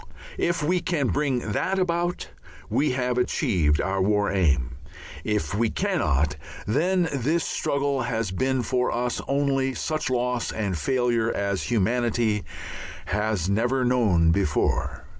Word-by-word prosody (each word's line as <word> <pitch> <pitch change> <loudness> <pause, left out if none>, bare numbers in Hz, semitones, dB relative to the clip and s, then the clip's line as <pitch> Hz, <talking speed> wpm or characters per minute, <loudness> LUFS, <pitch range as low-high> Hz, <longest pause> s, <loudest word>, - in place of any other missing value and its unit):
If 170 -2 0
we 180 +4 +2
can 160 -8 0
bring 130 -7 0
that 190 - 0
about 175 -1 -1 0.4
we 145 -2 +2
have 125 -1 0
achieved 80 -11 +1
our 95 0 0
War 105 +1 +2
Aim; 70 -10 +1 0.5
if 105 -1 -1
we 110 +2 +1
cannot, 80 - 0 0.3
then 175 - +2
this 150 +6 +1
struggle 140 -1 -1
has 115 -5 -2
been 130 +5 0
for 125 +2 0
us 120 +1 -1
only 135 -2 +1
such 155 -3 -2
loss 125 -1 0
and 100 -4 -2
failure 120 - +1
as 100 -1 -2
humanity 115 -1 +1 0.6
has 105 -3 -1
never 120 +6 +1
known 105 -10 +3
before. 80 -4 0
120 Hz, 130 wpm, -25 LUFS, 100-140 Hz, 0.6 s, known